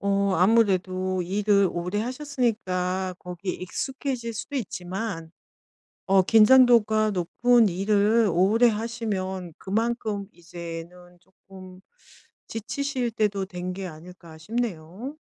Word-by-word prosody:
어 200 -1 +1
아무래도 185 -2 +2
일을 200 +1 +2
오래 180 +4 -2
하셨으니까 215 -9 -2
거기에 180 +1 -5
익숙해질 250 +4 -4
수도 275 +6 -5
있지만 185 -5 -5 0.8
어 195 -1 +5
긴장도가 220 0 +5
높은 220 +5 +3
일을 205 +4 +2
오래 215 +7 +4
하시면 205 -6 -3
그만큼 215 -1 -2
이제는 175 +1 -10
쪼끔 185 0 -15 0.7
지치실 250 +2 -3
때도 210 -3 0
된 180 -1 -5
게 190 0 -5
아닐까 170 0 -12
싶네요. 220 - -5
195 Hz, 240 characters per minute, -25 LUFS, 180-225 Hz, 0.8 s, 어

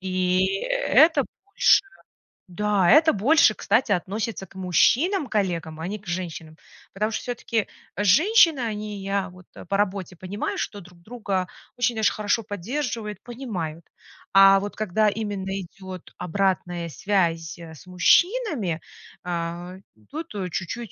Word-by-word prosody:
И 185 0 +1 0.2
это 335 - +4 0.2
больше 405 - +4 0.7
да, 200 0 +1
это 315 +2 +6
больше, 220 +2 +4
кстати, 225 +2 +1
относится 200 +3 -2
к - - -21
мужчинам-коллегам, 190 - +1
а 165 - -4
не 210 +2 -4
к 200 - -20
женщинам. 165 -3 -5 0.4
Потому 215 +3 -1
что - - -3
всё-таки 235 -3 -2 0.3
женщины, 315 - +5
они, 210 -3 -4
я 195 0 -2
вот 180 0 -16 0.2
по 195 - 0
работе 195 -2 -2
понимаю, 185 +4 -4
что 205 - -4
друг 180 -1 -16
друга 200 -4 -3 0.3
очень 245 -1 0
даже 220 -2 +2
хорошо 215 +2 0
поддерживают, 210 +1 -4
понимают. 185 - -5 0.5
А 195 0 +8
вот 205 +1 -6
когда 215 0 +1
именно 200 -2 -3
идёт 185 0 -10
обратная 180 -1 -1
связь 170 -3 -1
с 160 -1 -12
мужчинами, 230 - +2 0.4
а, 175 +1 -4 0.3
тут, 320 -5 -7
э, 190 -3 -3
чуть-чуть, 205 +6 -4
195 Hz, 130 wpm, -24 LUFS, 180-225 Hz, 0.7 s, А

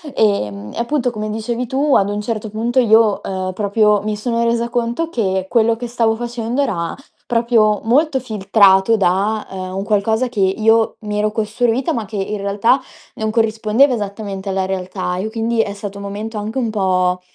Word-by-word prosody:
Ehm, 105 - 0
e - - -6
appunto, 250 0 0
come 215 -1 -4
dicevi 230 +3 -3
tu, 275 +3 +1
ad 200 0 +3
un 205 0 -2
certo 215 -1 -4
punto 235 +4 0
io, 220 -3 +4
uhm, 185 -1 -3
proprio 210 0 +2
mi 215 0 -2
sono 230 +1 -1
resa 235 0 0
conto 240 +7 -1
che 190 - -1
quello 230 -1 +3
che 245 0 -5
stavo 230 -2 +1
facendo 240 +2 -3
era, 170 -11 -2 0.3
proprio, 230 -3 +2
molto 270 +4 +2
filtrato 200 -2 +3
da, 200 +3 +1
ehm, 185 -1 -6
un 195 - -2
qualcosa 220 +4 +1
che 225 -5 -5
io 220 +4 +2
mi 210 -1 -4
ero 210 0 +1
costruita, 225 +3 0
ma 225 -3 -3
che 205 +1 -7
in 205 +2 -2
realtà 205 +6 +2 0.4
non 220 0 -2
corrispondeva 225 +3 +2
esattamente 200 -2 -5
alla 190 0 0
realtà, 185 -1 -3
e 210 +4 -3
quindi 225 0 0
è 200 - -3
stato 200 0 -7
un - - -7
momento 210 +2 -5
anche 215 +5 -4
un 235 - -1
po', 185 -3 +1
215 Hz, 185 wpm, -18 LUFS, 200-235 Hz, 0.4 s, io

